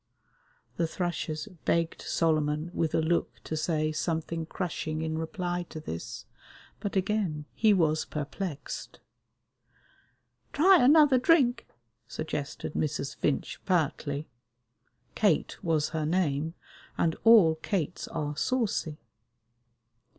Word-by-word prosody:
The 170 - +1
thrushes 160 -3 -3 0.2
begged 165 -1 0
Solomon 155 0 0
with 160 -2 0
a 160 - +2
look 170 +2 0
to 160 - -4
say 155 0 0
something 160 +1 -2
crushing 160 -3 -3
in 160 0 -2
reply 175 +1 -2
to 155 - -7
this, 85 - -6 0.5
but 205 - -4
again 190 -6 0
he 220 -1 +4
was 160 -5 +2
perplexed. 150 +1 -5 1.5
"Try 360 +1 +6
another 285 -1 +6
drink," 255 -5 +3 0.4
suggested 150 -2 -4
Mrs. 150 -2 -2
Finch 145 - -2
pertly. 155 -4 0 0.9
Kate 200 -4 +1
was 160 -4 +1
her 155 -2 -2
name, 160 -2 0 0.4
and 165 -1 +1
all 220 -8 +7
Kates 180 -5 -2
are 150 -2 -3
saucy. 200 - -1
160 Hz, 105 wpm, -29 LUFS, 155-190 Hz, 1.5 s, all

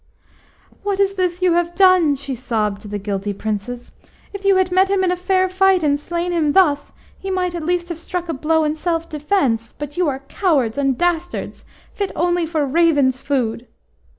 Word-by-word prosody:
HAT 400 -1 -1
is 395 0 +2
this 365 -1 -1
you 360 -2 +4
have 345 0 0
done?" 370 -5 +5
she 275 0 -5
sobbed 220 -5 -2
to 210 - -10
the 205 0 -4
guilty 200 0 -3
Princes. 220 +4 -5 0.4
"If 400 0 -7
you 395 -1 +4
had 375 -1 +2
met 375 +1 +3
him 395 -1 +1
in 360 -1 +2
fair 370 +1 +1
fight, 375 -1 +3
and 285 -1 +2
slain 345 +3 -3
him 315 -4 +1
thus, 295 -7 +3 0.3
he 385 - -6
might 365 -2 -1
at 340 -2 -4
least 350 0 0
have 340 -1 -5
struck 350 +1 -4
a 330 - -2
blow 315 +3 +1
in 305 0 0
self 330 0 -2
defence. 290 - -1
But 295 +2 -7
you 360 -2 +2
are 270 0 -5
cowards 285 - 0
and 275 -3 +1
dastards, 350 0 -2 0.3
fit 400 -2 -3
only 345 0 +1
for 310 -3 0
ravens' 285 -3 +2
food!" 250 -4 -2
330 Hz, 195 wpm, -20 LUFS, 275-365 Hz, 0.4 s, done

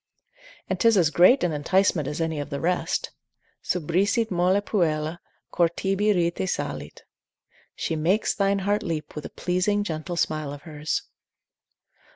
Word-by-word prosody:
And - - -2
'tis 230 -3 +4
as 165 -4 +3
great 185 - +5
an 175 - +1
enticement 155 0 +1
as 150 - -4
any 160 -2 -1
of 145 - -5
the 140 - -3
rest, 180 +3 -1 0.5
———subrisit 190 +7 0
molle 180 +2 +3
puella, 165 -5 -1 0.3
Cor 170 -1 +3
tibi 195 +4 0
rite 175 0 0
salit. - - -4 0.7
She 165 - -2
makes 175 +8 +1
thine 200 0 +1
heart 205 +1 +1
leap 165 -4 -4
with 150 - -7
a - - -5
pleasing 190 +3 0
gentle 170 -1 -4
smile 155 -3 -1
of 145 - -10
hers. 155 -2 -3
175 Hz, 150 wpm, -25 LUFS, 155-195 Hz, 0.7 s, great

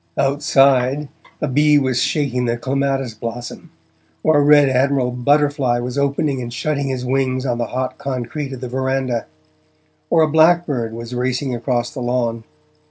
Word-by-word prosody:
Outside, 135 0 +2 0.3
a 150 - 0
bee 150 +2 +4
was 130 -3 +1
shaking 130 -5 0
the 120 0 -1
clematis 135 -1 -1
blossom, 115 +2 -7 0.5
or 155 -1 +4
a - - +3
red 145 -1 +6
admiral 130 -1 +1
butterfly 140 0 +1
was 120 +1 -4
opening 140 -1 0
and 120 -1 -6
shutting 140 +3 -2
his 130 -2 -3
wings 130 0 0
on 120 -2 -1
the 120 - -1
hot 130 0 -4
concrete 135 +2 -4
of 130 -2 -7
the 125 - -4
verandah, 130 -1 -2 0.8
or 160 - +4
a - - +3
blackbird 155 -7 +2
was 115 +1 -7
racing 130 +2 -1
across 120 0 -1
the 135 - -6
lawn. 120 -2 -1
130 Hz, 160 wpm, -19 LUFS, 125-140 Hz, 0.8 s, red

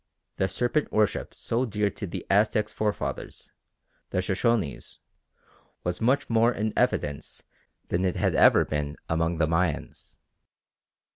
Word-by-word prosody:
The 95 - +1
serpent 120 - 0
worship 105 -1 +1
so 120 +3 -1
dear 105 -4 0
to 100 - -6
the - - -6
Aztecs' 105 +1 +2
forefathers, 105 -1 -3 0.6
the - - -3
Shoshonees, 100 - -1 0.9
was 90 +2 -2
much 135 +4 +2
more 115 +1 +3
in 110 -2 -2
evidence 75 -1 -1 0.5
than 90 +2 0
it 90 -2 0
had - - +1
ever - - +6
been 75 0 -3
among 80 +1 0
the 80 - +3
Mayans. 80 0 -2
100 Hz, 130 wpm, -27 LUFS, 85-110 Hz, 0.9 s, ever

